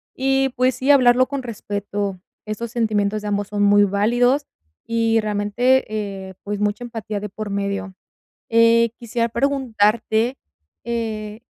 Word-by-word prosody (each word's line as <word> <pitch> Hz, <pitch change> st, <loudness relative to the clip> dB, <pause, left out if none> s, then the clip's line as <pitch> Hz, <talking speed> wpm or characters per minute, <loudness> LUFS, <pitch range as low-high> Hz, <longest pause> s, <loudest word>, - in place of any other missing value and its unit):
Y, 270 Hz, 0 st, +1 dB
pues 255 Hz, 0 st, +1 dB
sí, 270 Hz, +2 st, +2 dB
hablarlo 255 Hz, -2 st, +5 dB
con 280 Hz, -1 st, -3 dB
respeto. 205 Hz, -3 st, -4 dB, 0.3 s
Esos 215 Hz, +2 st, -4 dB
sentimientos 215 Hz, -3 st, 0 dB
de -, -, -4 dB
ambos 205 Hz, -1 st, -1 dB
son 205 Hz, -1 st, 0 dB
muy 205 Hz, 0 st, +6 dB
válidos 240 Hz, +8 st, +2 dB, 0.4 s
y, 230 Hz, 0 st, +2 dB
realmente, 215 Hz, +5 st, +1 dB, 0.5 s
eh, -, -, -10 dB
pues 205 Hz, 0 st, -4 dB
mucha 210 Hz, +3 st, -1 dB
empatía 225 Hz, -3 st, -5 dB
de 210 Hz, 0 st, -6 dB
por 215 Hz, +1 st, -6 dB
medio. 200 Hz, -1 st, -3 dB, 0.5 s
Eh, 230 Hz, 0 st, +4 dB
quisiera 235 Hz, 0 st, -1 dB
preguntarte, 235 Hz, -2 st, +1 dB, 0.5 s
eh, 220 Hz, -2 st, -4 dB
225 Hz, 135 wpm, -21 LUFS, 205-245 Hz, 0.5 s, muy